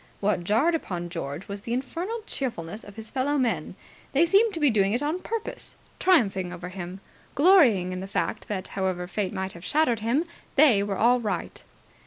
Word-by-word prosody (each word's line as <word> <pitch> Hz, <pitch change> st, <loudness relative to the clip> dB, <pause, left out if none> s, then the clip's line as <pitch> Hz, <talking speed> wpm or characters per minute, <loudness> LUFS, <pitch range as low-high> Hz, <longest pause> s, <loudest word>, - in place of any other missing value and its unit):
What 200 Hz, -3 st, 0 dB
jarred 225 Hz, -, +3 dB
upon 175 Hz, -, -3 dB
George 160 Hz, 0 st, -5 dB
was 200 Hz, 0 st, -6 dB
the 230 Hz, +3 st, -4 dB
infernal 345 Hz, -, -3 dB
cheerfulness 215 Hz, -, -4 dB
of 205 Hz, -, -12 dB
his 220 Hz, -1 st, -9 dB
fellow 280 Hz, +2 st, 0 dB
men. 220 Hz, -, -1 dB, 0.4 s
They 295 Hz, +5 st, +5 dB
seemed 405 Hz, +6 st, +4 dB
to -, -, -3 dB
be 295 Hz, -4 st, +4 dB
doing 200 Hz, -2 st, +2 dB
it 245 Hz, +5 st, 0 dB
on 310 Hz, +5 st, -1 dB
purpose 450 Hz, +3 st, -5 dB, 0.2 s
triumphing 200 Hz, -, +3 dB
over 180 Hz, 0 st, -7 dB
him 185 Hz, 0 st, -7 dB, 0.3 s
glorying 275 Hz, -, +5 dB
in 185 Hz, -, -4 dB
the 190 Hz, -, -6 dB
fact 215 Hz, +2 st, -2 dB
that, 195 Hz, -3 st, -4 dB
however 185 Hz, -2 st, -2 dB
Fate 190 Hz, +1 st, -2 dB
might 190 Hz, -1 st, -3 dB
have 170 Hz, -, -12 dB
shattered 285 Hz, -5 st, +2 dB
him, 240 Hz, +9 st, +1 dB, 0.3 s
they 265 Hz, -8 st, +6 dB
were 200 Hz, -1 st, -2 dB
all 245 Hz, +4 st, +4 dB
right. 205 Hz, -6 st, -4 dB
215 Hz, 190 wpm, -26 LUFS, 185-290 Hz, 0.4 s, they